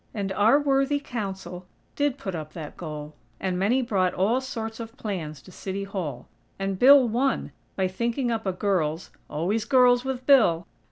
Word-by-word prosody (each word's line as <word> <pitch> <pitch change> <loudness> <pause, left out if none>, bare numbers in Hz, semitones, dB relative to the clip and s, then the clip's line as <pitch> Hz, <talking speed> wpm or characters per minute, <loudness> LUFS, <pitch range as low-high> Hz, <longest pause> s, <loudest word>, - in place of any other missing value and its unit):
And 200 -2 -2
our 220 +8 +4
worthy 280 0 +2
Council 190 -8 -6 0.3
did 285 -2 0
put 190 -8 -5
up 155 -2 -6
that 155 -4 -8
goal, 150 -2 -7 0.3
and 185 -2 -1
many 240 +7 +2
brought 190 -6 +1
all 225 +8 +2
sorts 225 -4 -5
of 225 0 -8
plans 155 -10 -5
to - - -14
City 195 +2 -5
Hall. 170 -11 -5 0.3
And 195 -1 -3
Bill 270 0 +8
won, 250 +5 0 0.2
by 190 -1 +1
thinking 235 +6 -1
up 225 -3 -2
a - - +2
girls' 180 -4 -1 0.2
(always 190 +9 -1
girls, 245 +1 +4
with 260 -1 -4
Bill!) 195 - +5
200 Hz, 170 wpm, -26 LUFS, 180-245 Hz, 0.3 s, Bill